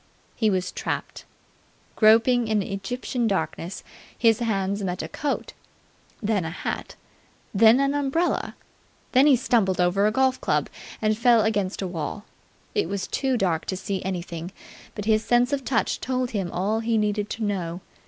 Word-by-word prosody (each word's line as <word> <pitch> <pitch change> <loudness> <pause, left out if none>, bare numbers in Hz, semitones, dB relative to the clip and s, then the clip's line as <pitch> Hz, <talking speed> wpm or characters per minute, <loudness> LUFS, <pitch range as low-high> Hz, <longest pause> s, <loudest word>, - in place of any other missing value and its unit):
He 220 -2 +2
was 185 -2 -1
trapped. - - -4 0.7
Groping 230 +2 +5
in 215 -2 +1
Egyptian 240 +5 -3
darkness, 190 -2 -3 0.3
his 225 -1 +4
hands 200 -3 -1
met 180 -3 -2
a - - -4
coat, 285 - -3 0.7
then 205 -3 +1
a 160 - -3
hat, 170 - -5 0.6
then 225 +4 +6
an 275 0 +2
umbrella. 290 +5 0 0.6
Then 265 +3 +5
he 285 - +7
stumbled 225 -7 +1
over 185 +3 +3
a - - +2
golf 260 +2 +1
club - - 0 0.3
and 215 0 +3
fell 235 0 +4
against 205 -3 -1
a - - -2
wall. 180 +4 -5 0.5
It 415 - 0
was 200 -2 -2
too 265 -2 0
dark 175 -7 0
to 185 - -3
see 190 0 -3
anything, 175 -2 -4 0.4
but 205 - -5
his 215 0 +3
sense 245 +3 +2
of 275 -1 -1
touch 245 -3 0
told 255 -1 -2
him 195 -5 -2
all 205 +5 0
he 225 0 0
needed 210 -1 0
to 225 - -4
know. 185 -4 -2
215 Hz, 165 wpm, -25 LUFS, 190-245 Hz, 0.7 s, he